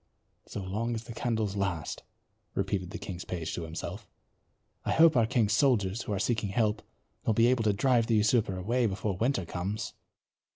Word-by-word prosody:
"So 100 - -5
long 110 +5 -2
as 110 - -5
the 115 - -8
candles 110 -3 -1
last," 95 -7 -2 0.5
repeated 95 -3 -1
the - - -5
king's 90 -2 -6
page 85 -3 -4
to 85 - -3
himself. 80 0 -6 0.8
"I - - 0
hope 160 -1 +6
our 115 -3 +4
king's 115 -4 +2
soldiers, 110 -5 +2
who - - -5
are 100 - 0
seeking 105 +1 0
help, 105 +1 +1 0.4
will 110 - +1
be 115 - +5
able 120 -2 +3
to 105 - +4
drive 120 +2 +3
the 115 - +3
usurper 105 -2 +2
away 115 +6 +1
before 100 0 -2
winter 115 -1 0
comes." 95 +6 -3
105 Hz, 180 wpm, -30 LUFS, 95-115 Hz, 0.8 s, hope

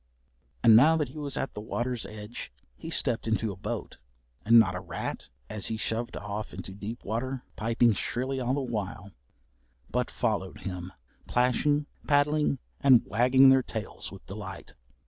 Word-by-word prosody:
And 115 -2 +8
now 155 +8 +7
that 150 -5 -1
he 150 - -9
was 145 -2 -2
at 135 - -2
the 105 - -6
water's 120 +2 -3
edge 105 +2 -8 0.2
he 160 - -8
stepped 125 -8 -1
into 110 -1 0
a - - -7
boat, 95 - -5 0.4
and 115 +2 +7
not 100 -5 +6
a 90 - -3
rat, - - -5 0.2
as 105 -2 -2
he 110 - -2
shoved 115 +2 -2
off 105 +1 -5
into 95 - -7
deep 105 +4 -7
water, 125 +5 -3
piping 115 +1 +3
shrilly 130 +5 -2
all 125 +2 0
the 145 - -1
while, 105 -5 -4 0.8
but - - 0
followed - - -2
him, 90 -1 -5 0.4
plashing, 145 +4 +2 0.2
paddling, 150 0 +3 0.2
and 130 -4 +6
wagging 130 +5 +5
their 130 0 +6
tails 110 -3 -6
with 95 - -12
delight. 95 -1 -8
115 Hz, 165 wpm, -28 LUFS, 105-130 Hz, 0.8 s, And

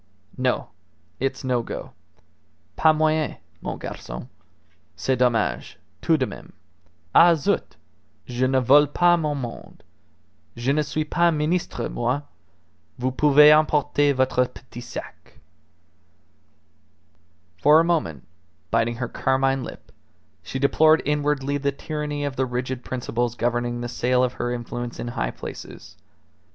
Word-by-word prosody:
"No; - - -1 0.5
it's 135 +1 -2
no 125 -2 +1
go. - - -7 0.8
_Pas 155 -1 +4
moyen, 155 -1 +1 0.2
mon - - -4
garcon. - - -8 0.7
C'est 130 - 0
dommage, 125 -2 0 0.3
tout 160 - +3
de 130 - +2
meme. - - -10 0.6
Ah! 170 0 +7
zut! 150 - -1 0.5
Je 125 +1 0
ne 130 0 +2
vole 145 +4 +5
pas 175 +2 +4
mon 150 -2 -1
monde. 120 -4 -8 0.7
Je 125 +4 0
ne 150 - +2
suis 155 +1 -2
pas 170 +3 +2
ministre 155 -5 -1
moi! 125 +5 -1 0.7
Vous 130 +1 -1
pouvez 150 +2 +7
emporter 145 -1 +3
votre 130 -1 +2
petit 120 -1 -12
sac_." 120 - -10 2.2
For 150 +2 +7
a - - +4
moment, 150 - -1 0.5
biting 115 +1 +1
her 125 +1 -3
carmine 135 +2 0
lip, - - -10 0.5
she - - -6
deplored 155 +3 +4
inwardly 145 -1 0
the 140 0 0
tyranny 150 0 -4
of 140 -2 -4
the 130 0 +1
rigid 125 0 -3
principles 120 -2 -2
governing 120 0 -1
the 120 - -3
sale 125 +1 +1
of 125 -1 0
her 120 0 -3
influence 120 0 -5
in 120 - -4
high 120 - -2
places. - - -9
135 Hz, 130 wpm, -23 LUFS, 120-150 Hz, 2.2 s, Ah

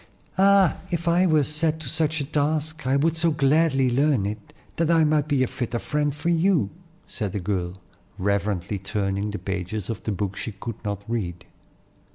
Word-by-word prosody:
"Ah, 195 -2 +5
if 170 0 -2
I 175 +2 +4
were 155 -3 +4
set 155 +2 0
to 155 - -7
such 155 +2 0
a - - -2
task, 155 0 -1
I 135 - +3
would 160 +3 +2
so 165 +1 +3
gladly 145 -3 +3
learn 135 -4 +2
it, 105 0 -5 0.3
that 165 -1 +1
I 165 -1 +5
might 150 -1 +2
be 140 -3 +2
a - - +1
fitter 120 -1 -3
friend 145 +4 0
for 150 +4 -3
you," 170 - +2 0.4
said 105 -5 -4
the 100 - -1
girl, 90 -1 -2 0.4
reverently 100 0 -1
turning 100 +1 -2
the 105 - -4
pages 95 +2 -4
of 110 - -6
the 110 - -3
book 100 -1 -2
she 110 - -5
could 105 +3 -7
not 100 -1 -3
read. 90 -7 -3
135 Hz, 190 wpm, -24 LUFS, 100-155 Hz, 0.4 s, Ah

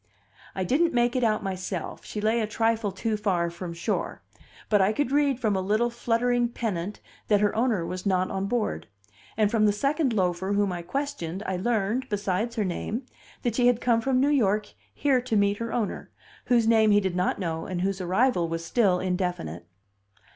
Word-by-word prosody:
I 190 - -1
didn't 295 - +2
make 240 +1 +2
it 255 - +1
out 215 -2 +1
myself, 185 -2 -4
she 210 - -6
lay 220 +2 +1
a 215 - -1
trifle 225 -1 0
too 215 +3 -2
far 180 -5 0
from 170 0 -6
shore; 170 +1 -3 0.4
but 210 -2 +3
I 195 +3 +3
could 270 +2 -1
read 285 -3 +2
from 215 -5 +1
a 190 - 0
little 215 +5 +1
fluttering 240 +1 +1
pennant 205 -5 -4 0.3
that 205 -1 +4
her 205 -1 +2
owner 225 -7 +1
was 185 +1 -5
not 185 -2 +1
on 195 0 -2
board; 210 - -2 0.5
and 210 -2 +3
from 215 -2 +3
the - - +4
second 275 +6 0
loafer 190 -1 0
whom 200 -1 +1
I 175 -1 -4
questioned 200 - -4
I 190 - -1
learned, 225 +5 -1
besides 205 +2 -1
her 215 -3 0
name, 210 +7 -3 0.4
that 240 - 0
she 245 +1 +3
had 245 -2 +3
come 235 -2 +2
from 255 +1 +1
New 275 +2 +3
York 210 -6 +1 0.2
here 270 -3 +1
to 245 -2 -2
meet 200 0 +3
her 230 +1 -4
owner, 225 -4 -2 0.4
whose 235 -2 +3
name 220 -1 +5
he 205 0 +5
did 190 -3 -2
not 180 0 0
know 165 -4 -3
and 180 -1 -3
whose 195 0 -1
arrival 185 -1 +1
was 165 0 -4
still 190 -1 +2
indefinite. 180 - -3
210 Hz, 195 wpm, -26 LUFS, 185-240 Hz, 0.5 s, name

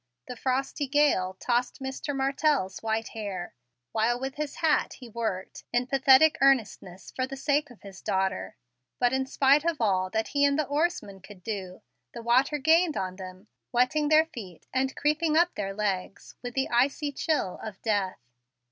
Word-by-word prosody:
The 250 - -7
frosty 270 +3 -1
gale 265 -10 +2
tossed 245 0 0
Mr. 265 +2 -4
Martell's 270 -7 0
white 225 0 -1
hair, 200 -5 -6 0.4
while 230 +2 +1
with 265 +1 -4
his 295 0 -4
hat 315 -2 +1
he 250 - -11
worked, 220 -5 -4
in 245 +1 +1
pathetic 270 +3 +5
earnestness, 220 -9 +1
for 255 0 -1
the 270 - -7
sake 290 +1 0
of 245 - -17
his 195 -2 -11
daughter; 190 0 -1 0.4
but 245 0 +2
in 265 0 0
spite 275 +2 +4
of 335 -2 -1
all 190 -5 +1
that 220 +3 -2
he 285 0 +1
and 280 0 +3
the 310 - +1
oarsman 285 - -1
could 190 -1 -14
do, 195 -2 -6 0.3
the 235 - -7
water 260 +5 +3
gained 320 +3 +3
on 185 -1 -3
them, 185 0 -10 0.3
wetting 255 +5 +2
their 310 +1 +6
feet 210 - -10
and 265 0 0
creeping 305 +1 +1
up 345 +1 +3
their 195 -1 -3
legs 195 -1 -3
with 245 -1 -7
the 270 - +1
icy 275 +4 +1
chili 285 - -1
of 210 -3 -8
death. 205 -4 0
250 Hz, 175 wpm, -27 LUFS, 200-285 Hz, 0.4 s, their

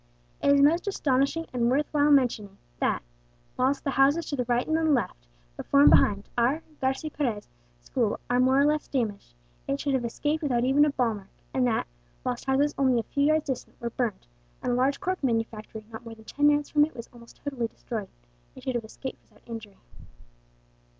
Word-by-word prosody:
"It - - +2
is 280 0 +5
most 330 +7 +3
astonishing 280 -3 +1
and 240 -1 +1
worth 280 +4 +2
while 295 -1 +3
mentioning 230 -8 +2 0.2
that, - - 0 0.5
whilst 265 +2 +1
the 275 - -1
houses 280 +5 +3
to - - 0
the 250 -3 -1
right 240 +1 +1
and 315 -1 +3
left, - - -3 0.3
before 280 - +2
and - - +8
behind, 200 -1 +4
our 265 +7 +2 0.2
(Garci 265 +4 -1
Perez) 235 -8 -2 0.4
school - - -1
are 245 0 +2
more 260 +2 +4
or 280 - +5
less 300 0 +1
damaged, 215 - -3 0.3
it 140 - -1
should 280 - -1
have 260 -2 +1
escaped 295 +6 -1
without 250 -6 +1
even 275 +3 +4
a - - +2
ball 250 -5 +1
mark; 200 -2 -10 0.2
and 255 -1 +2
that, 230 - 0 0.4
whilst 125 - -3
houses 275 +2 +2
only 260 -3 +3
a - - -2
few 280 +4 0
yards 310 +1 +3
distant 265 -3 -5
were 235 0 -4
burned, 235 -4 -2 0.4
and - - 0
a - - +2
large 265 +3 +1
cork 370 -3 -2
manufactory 225 -3 -2
not 225 +1 -8
more 230 -1 -9
than 220 0 -17
ten 290 +5 +3
yards 295 0 +2
from 295 -1 +5
it 310 - -2
was 235 - -8
almost 235 -1 -15
totally 265 -5 -2
destroyed, 220 -3 -6 0.5
it - - -12
should 260 - -2
have 240 -2 -2
escaped 260 +4 -8
without 210 - -27
injury. 220 -4 -8
260 Hz, 205 wpm, -27 LUFS, 230-290 Hz, 0.5 s, and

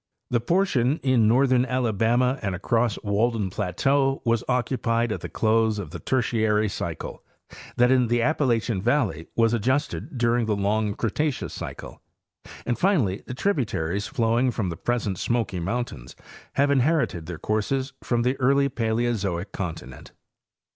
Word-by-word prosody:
The 120 - +3
portion 145 -2 +1
in 130 -5 +3
northern 125 +2 +4
Alabama 125 0 +1
and 100 -3 -2
across 115 +4 0
Walden 105 -1 0
plateau 135 +9 0
was 115 -1 +2
occupied 120 -2 0
at - - -3
the - - -6
close 110 -1 +2
of 90 -7 -6
the - - -7
Tertiary 110 -4 +1
cycle; - - -5 0.5
that 125 +1 +4
in 125 -2 +4
the 120 +1 +1
Appalachian 120 -6 +1
valley 105 - 0
was 115 0 +3
adjusted 130 +4 -1
during 120 -1 +1
the 105 - +1
long 105 +1 0
Cretaceous 140 +6 -2
cycle; - - -8 0.6
and, 120 - -1
finally, 140 - +2
the 125 - -5
tributaries 105 - -1
flowing 120 -2 +1
from 110 -6 -2
the 85 - -4
present 105 -2 -2
Smoky 115 -6 -1
mountains 85 - -4 0.4
have 140 +1 +2
inherited 135 - +1
their 85 -2 -5
courses 130 - -1
from 120 -1 0
the 125 +2 +1
early 140 +2 +3
Paleozoic 110 -6 -1
continent. 80 - -7
115 Hz, 140 wpm, -25 LUFS, 105-130 Hz, 0.6 s, northern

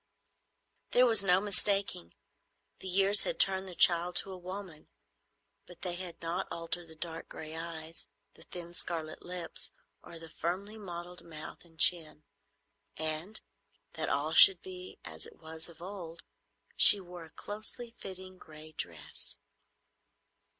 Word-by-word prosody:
There 250 - +7
was 225 -4 +5
no 180 -1 +4
mistaking. 200 - -1 0.6
The 190 - -7
years 195 +2 +7
had - - -1
turned 190 0 +3
the 180 - -7
child 175 +1 +5
to 195 - +1
a - - -6
woman, 185 -3 -8 0.8
but 175 -1 -14
they 180 -2 -2
had 175 -1 -7
not 170 +3 -2
altered 170 +1 -4
the 160 - -12
dark 165 0 -2
gray 155 0 -8
eyes, 165 0 -7 0.3
the - - -17
thin 175 -1 -8
scarlet 160 -3 -3
lips, 175 -2 -6 0.3
or 170 - -11
the 165 0 -11
firmly 195 +5 -3
modelled 180 -4 -7
mouth 155 -2 -9
and 165 -2 -21
chin; 155 -4 +6 0.7
and, 160 +7 -2 0.5
that - - -3
all - - 0
should 390 -2 +9
be 370 0 -9
as - - -7
it 460 - -16
was 160 +1 -3
of 170 0 -13
old, 175 -4 -7 0.5
she 205 - +9
wore 175 -2 -10
a - - -15
closely 215 +6 -5
fitting 185 -1 -9
gray 155 0 -13
dress. 85 - -7
175 Hz, 145 wpm, -32 LUFS, 165-195 Hz, 0.8 s, should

